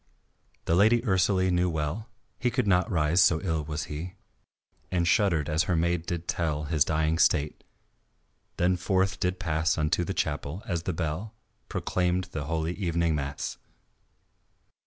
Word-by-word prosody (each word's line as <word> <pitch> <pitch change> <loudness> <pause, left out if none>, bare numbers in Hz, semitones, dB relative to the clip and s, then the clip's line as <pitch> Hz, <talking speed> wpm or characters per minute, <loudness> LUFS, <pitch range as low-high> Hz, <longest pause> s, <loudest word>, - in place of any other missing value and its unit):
The - - +1
Lady 110 +6 +4
Ursalie 95 -3 +2
knew 90 0 +2
well 80 +7 -3 0.3
He 125 - +1
could 115 - 0
not 95 +1 +2
rise, 85 -1 +3
so 80 -3 +4
ill 80 -4 -1
he 75 - -11
was, 75 0 -3 1.0
And 85 -2 +1
shuddered 90 -8 +2
as 80 +1 +1
her 90 - +1
maid 85 +1 0
did 85 -1 -3
tell 75 -3 -1
His 75 -1 +2
dying 80 +1 0
state, 75 0 +2 0.9
then 90 +1 +2
forth 95 +1 0
did 90 0 -1
pass 80 -2 0
Unto 75 +2 +1
the 95 +3 -4
chapel, 75 +4 -2
as 85 -3 -2
the 90 - -2
bell 85 +7 -3 0.3
Proclaimed 90 +1 -1
the 80 -5 -4
holy 80 +2 -1
evening 85 -3 0
mass. 70 -1 -4
85 Hz, 155 wpm, -27 LUFS, 80-95 Hz, 1.0 s, Lady